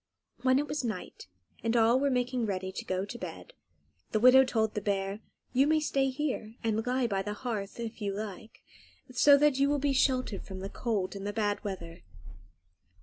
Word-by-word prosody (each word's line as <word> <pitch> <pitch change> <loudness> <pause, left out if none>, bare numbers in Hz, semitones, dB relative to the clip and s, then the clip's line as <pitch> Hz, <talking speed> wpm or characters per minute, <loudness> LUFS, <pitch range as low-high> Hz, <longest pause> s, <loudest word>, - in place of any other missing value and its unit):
When 260 0 +4
it 295 +1 0
was 295 -2 -2
night, 210 - -5 0.4
and 230 +1 +1
all 230 +2 +5
were 280 +1 +2
making 250 -2 0
ready 190 -1 -3
to - - -6
go 185 +1 -1
to 240 +4 -8
bed, 175 -5 -8 0.6
the 215 - +3
widow 255 +3 +8
told 220 -4 0
the 210 - -2
bear, 195 0 -1 0.3
"You 265 +3 +4
may 310 0 +3
stay 275 -3 +1
here 260 -5 -3
and 225 -1 0
lie 255 0 +1
by 200 -4 0
the 205 +2 -4
hearth, 210 -3 -4
if 230 -1 -6
you 200 -1 -1
like, 215 +1 -7 0.5
so 280 +3 +6
that 290 -2 +3
you 280 +1 +4
will 290 - +2
be 285 0 +1
sheltered 255 -5 +1
from 190 -1 -8
the 195 - -5
cold 210 -5 -1
and 200 - -6
from - - -6
the 205 - -3
bad 205 -2 -1
weather." 175 -4 -6
225 Hz, 205 wpm, -30 LUFS, 200-260 Hz, 0.6 s, widow